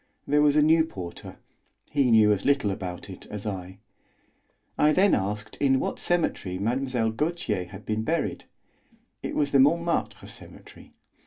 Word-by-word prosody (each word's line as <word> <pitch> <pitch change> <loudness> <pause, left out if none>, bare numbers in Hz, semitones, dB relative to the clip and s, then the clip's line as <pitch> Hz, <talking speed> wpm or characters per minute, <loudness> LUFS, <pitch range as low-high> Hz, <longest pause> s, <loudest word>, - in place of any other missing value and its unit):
There 150 +1 +2
was 150 -1 +4
a 150 - +5
new 160 +1 +5
porter; 95 - -8 0.5
he 140 -4 +2
knew 110 -2 +6
as 100 -2 0
little 140 -7 +2
about 90 -1 -6
it 95 -2 -11
as 105 0 -7
I. 95 -2 -5 1.0
I 150 +1 +3
then 195 +4 +4
asked 105 +2 -2
in 135 -2 +2
what - - -3
cemetery 160 - -1
Mlle. 120 +2 -1
Gautier 120 - -2
had 95 +3 -12
been 110 0 -1
buried. 160 +8 -2 0.8
It - - -5
was 145 -1 0
the 140 - +4
Montmartre 170 +5 +1
Cemetery. - - -14
120 Hz, 155 wpm, -26 LUFS, 100-150 Hz, 1.0 s, knew